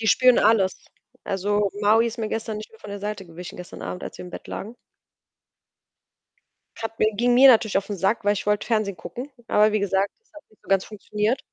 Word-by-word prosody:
Die 220 - -2
spüren 255 +2 +5
alles. 205 -3 +2 0.4
Also, 200 +1 0
Maui 220 +3 +4
ist 230 +1 -5
mir 220 -1 -2
gestern 220 -1 -3
nicht 215 - -9
mehr 225 - -18
von 210 - -10
der 200 0 -6
Seite 205 -2 -5
gewichen, 175 +1 -9
gestern 180 0 -9
Abend, 180 - -5
als - - -8
wir - - -8
im 180 - -10
Bett - - -9
lagen. 220 +4 -7 2.1
Hat 225 0 -5
mir 215 - +3
ging 240 +4 +2
mir 265 +2 +8
natürlich 220 -5 +4
aufn 200 +1 -3
Sack, 195 +4 0
weil 205 - +4
ich 205 - -4
wollte 210 0 +1
Fernsehen 215 -5 0
gucken. 250 - -7 0.2
Aber 210 +1 +4
wie 215 - +1
gesagt, 195 0 +1
das 450 - -38
hat 305 - -12
nicht 215 - -28
so - - -24
ganz 195 -1 +2
funktioniert. 210 +3 -2
210 Hz, 220 wpm, -24 LUFS, 200-225 Hz, 2.1 s, mir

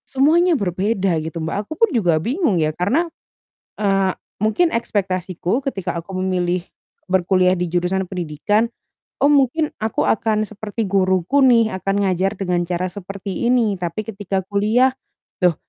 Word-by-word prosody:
Semuanya 320 +5 +3
berbeda 190 -1 0
gitu, 160 +2 -6
Mbak, 160 0 -3
aku - - -5
pun 455 +2 +4
juga 175 -9 +2
bingung 235 - 0
ya 155 -1 +1
karena, 220 - +1 0.7
eee, 195 -2 +1 0.3
mungkin 275 +11 +2
ekspektasiku 185 -2 -1
ketika 235 -10 -3
aku 185 +3 -9
memilih 180 -1 0 0.5
berkuliah 185 0 +3
di 180 -1 -1
jurusan 180 +2 0
pendidikan, 190 +6 0 0.5
"Oh, 285 - +5
mungkin 290 +3 +2
aku 220 +1 0
akan 215 0 +1
seperti 215 +1 -5
guruku 190 +6 +2
nih, 230 -3 +4
akan 195 +1 0
ngajar 190 +1 +1
dengan 180 -2 0
cara 180 +1 -1
seperti 195 +2 -5
ini." 230 -6 +2
Tapi 175 +4 -3
ketika 200 -2 -3
kuliah, 215 +7 +2 0.5
"loh, 180 -2 +4
195 Hz, 140 wpm, -20 LUFS, 180-225 Hz, 0.7 s, Oh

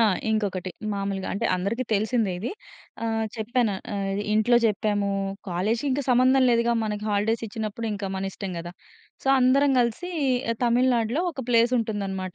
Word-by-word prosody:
ఆ! - - +6 0.3
ఇంకొకటి 195 -4 -1 0.2
మామూలుగా 195 -1 -3
అంటే 200 - -1
అందరికి 200 +8 -2
తెలిసిందే 215 -1 +1
ఇది. 210 - -3 0.5
ఆహ్, 225 -1 0
చెప్పాను 225 -1 0 0.2
ఆహ్, 195 0 -2
ఇంట్లో 220 +3 +4
చెప్పాము. 205 -1 0 0.4
కాలేజికి 215 +10 0
ఇంక 285 +2 0
సంబంధం 255 +2 +5
లేదుగా 235 0 +2
మనకి 210 -1 -3
హాలిడేసిచ్చినప్పుడు 220 +1 -2
ఇంక 200 -2 -4
మనిష్టం 195 0 -4
గదా! 170 +1 -7 0.5
సో, - - -9
అందరం 270 +2 +4
గలిసి 245 +10 -1 0.5
తమిళనాడులో 240 +3 +2
ఒక 265 -5 -7
ప్లేసుంటుందనమాట. 215 -6 +1
220 Hz, 130 wpm, -25 LUFS, 200-240 Hz, 0.5 s, ఆ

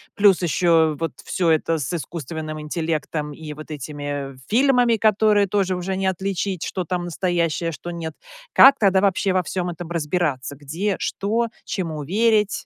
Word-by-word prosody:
Плюс 200 -3 +5
еще 165 -2 +3
вот 165 0 -2
всё 175 -3 0
это 160 +1 +2
с 145 +1 -3
искусственным 155 0 -5
интеллектом 155 -1 -3
и 150 +1 -8
вот 155 +1 -10
этими 145 -1 -5
фильмами, 245 -1 +4
которые 215 -1 +3
тоже 190 -2 0
уже 185 +2 -3
не 190 0 -1
отличить, 190 -1 -2
что 185 - -3
там 175 +1 -3
настоящее, 170 -2 -1
а - - -3
что- 175 +2 -7
нет. 165 -2 -6 0.4
Как 270 +1 +8
тогда 195 -4 +4
вообще 195 0 +2
во 185 0 +1
всем 180 +1 -3
этом 175 0 -7
разбираться? 150 -5 -1
Где, 170 +8 -2
что, 225 +4 -1 0.2
чему 160 -6 -4
верить? 210 +5 +1
175 Hz, 160 wpm, -22 LUFS, 155-195 Hz, 0.4 s, Как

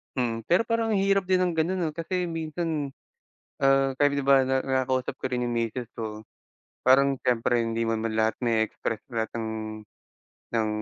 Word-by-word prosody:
Hmm, 115 -3 -1
pero 180 +6 +4
parang 230 -1 0
ang 200 - +2
hirap 195 -1 +2
din 185 -1 +3
ng 180 -2 0
ganun, 180 +4 +1
'no? 160 - 0
Kasi 170 +3 -2
minsan, 160 -3 -3 0.6
ah, 135 -1 +3
kahit, 145 0 +3
di - - -2
ba, 135 -1 +6
na 130 0 +2
nakakausap 130 -1 0
ko - - -7
rin 125 -1 0
yung 120 -1 -2
misis 115 +1 -2
ko. 110 -1 -5 0.6
Parang 135 +2 +5
siyempre 120 0 +2
hindi 115 0 -1
man 115 -1 0
man 115 -1 -1
lahat 110 0 +2
na-e-express 110 -1 0
lahat 110 -1 -1
ng 115 -1 -3 1.0
ng 110 -2 0
130 Hz, 180 wpm, -26 LUFS, 115-160 Hz, 1.0 s, ba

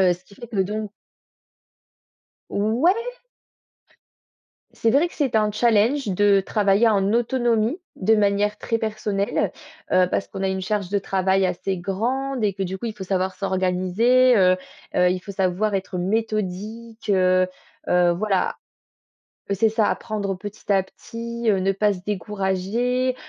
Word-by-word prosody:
heu, 180 -2 +4
ce 180 - -19
qui 200 - -18
fait 235 +3 -11
que 225 - -7
donc 210 +1 -4 1.6
Ouais. 230 - +2 1.8
C'est 225 - +1
vrai 290 +8 +4
que - - -16
c'était 265 -7 +1
un 210 0 +1
challenge 230 +4 +2
de 200 +1 +4
travailler 205 +2 +2
en 200 -1 +2
autonomie 240 - +1 0.2
de 220 +3 +3
manière 205 0 +1
très 230 +2 -1
personnelle, 210 -2 -1 0.4
heu, 185 -1 +4
parce - - -1
qu'on 195 -1 -7
a 190 - +1
une 190 0 -2
charge 200 -1 -2
de 200 0 +1
travail 190 0 +1
assez 185 +1 -2
grande 245 +8 -2
et 200 -2 +1
que 195 - -3
du 190 +1 -4
coup, 215 - -6
il 220 - -4
faut 190 - -6
savoir 190 0 -1
s'organiser, 190 +7 +2
heu, 185 -2 +5 0.4
heu, 180 0 +4
il 185 0 -1
faut 200 - -9
savoir 195 +2 0
être 190 -1 -3
méthodique, 215 +3 -3
heu, 185 -1 +3 0.4
heu, 180 -1 +4
voilà. 195 0 0 0.9
C'est 205 +3 +2
ça, 220 -1 +2
apprendre 200 -3 -2
petit 205 +2 -9
à 195 -1 +4
petit, 235 +4 -7
heu, 200 - +2
ne 195 +1 +2
pas 205 +2 +2
se 180 - -9
décourager, 210 +6 -1
205 Hz, 155 wpm, -23 LUFS, 190-225 Hz, 1.8 s, heu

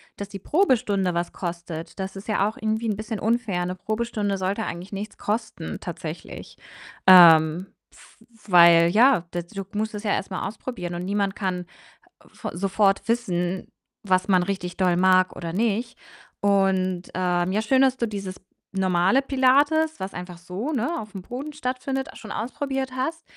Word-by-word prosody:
dass 200 0 -7
die 195 - -8
Probestunde 220 - +1
was 170 0 -2
kostet. 170 0 -6
Das 190 +1 -4
ist 195 +3 -9
ja 205 -1 +2
auch 220 - -5
irgendwie 220 +1 -1
'n 210 - 0
bisschen 215 0 -5
unfair, 215 -6 0
'ne 180 - -3
Probestunde 215 -1 -2
sollte 195 +4 -1
eigentlich 175 +3 -6
nichts 205 +2 -6
kosten 220 +2 -4
tatsächlich. - - -8 0.5
Ähm, 170 -1 +8 0.2
w - - -20 0.3
weil 170 -1 +7
ja, 230 -1 +4
da 175 - -2
du 190 +3 -7
musst 215 +1 -2
das 210 +1 -6
ja 205 - 0
erst - - -2
mal 185 - -3
ausprobieren 210 -5 -6
und 175 - -4
niemand 200 0 -1
kann 180 -2 -3 0.6
v - - -7
sofort 195 +2 +1
wissen, 185 -6 -1 0.4
was 185 -2 +1
man 185 -3 +4
richtig 180 -2 -4
doll 180 -2 +2
mag 185 0 +4
oder 165 -1 -5
nicht. 230 +3 -1 0.4
Und, 190 -2 +2
ähm, 180 0 0
ja 210 +3 +1
schön, 260 +4 +3
dass 260 -1 +3
du 235 - -1
dieses 195 -3 -6 0.3
normale 190 +5 +2
Pilates, 285 +4 +3
was 190 +1 -5
einfach 180 -1 -7
so, 180 - -5
ne, 250 -4 0
auf'm 210 -3 -9
Boden 260 +9 -6
stattfindet, 265 -1 -3
a - - -19
schon 215 - -10
ausprobiert 265 +2 -3
hast. 320 +6 -3
200 Hz, 165 wpm, -24 LUFS, 180-230 Hz, 0.6 s, Ähm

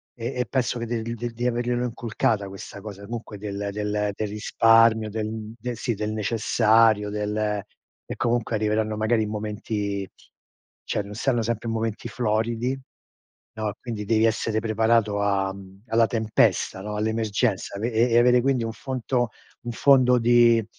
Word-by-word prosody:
e 120 +2 -4
e 125 - +1
penso 125 -2 -1
che 120 - -3 0.2
di 115 +1 -4 0.2
di 120 +2 -4
averglielo 120 0 0
inculcata 115 -3 -1
questa 100 +1 -9
cosa, 100 -1 -9
comunque, 115 -1 -7
del 100 0 -4
del 105 0 -1
del 110 - -2
risparmio, 110 +1 +4
del 110 0 -4
del 120 +1 -4
sì, 120 +1 -1
del 105 +1 -3
necessario, 110 0 +3
del 105 0 -2 0.7
e, - - -6
comunque, 120 -1 0
arriveranno, 110 0 0
magari, 110 +1 +2
in 105 - -4
momenti 105 -2 -3 0.8
cioè, 105 - -1
non 100 +1 -9
saranno 120 0 +1
sempre 115 0 -2
momenti 115 -1 -2
floridi, 115 +3 -1 0.8
no, 110 -2 -2
quindi 110 -4 -5
devi 110 +1 +3
essere 110 -1 +1
preparato 110 -1 +2
am 95 -1 -2
alla 115 -1 +3
tempesta, 110 -3 +1
no, 105 +1 -5
all'emergenza. 110 -1 -1
E 115 +3 -1
e 115 +1 +2
e - - +6
avere, 125 +1 +5
quindi, 130 -2 +1
un 115 - -3
fonto 125 -1 -2 0.3
un 120 - -4
fondo 125 0 +5
di 120 -1 +5
110 Hz, 155 wpm, -24 LUFS, 105-120 Hz, 0.8 s, e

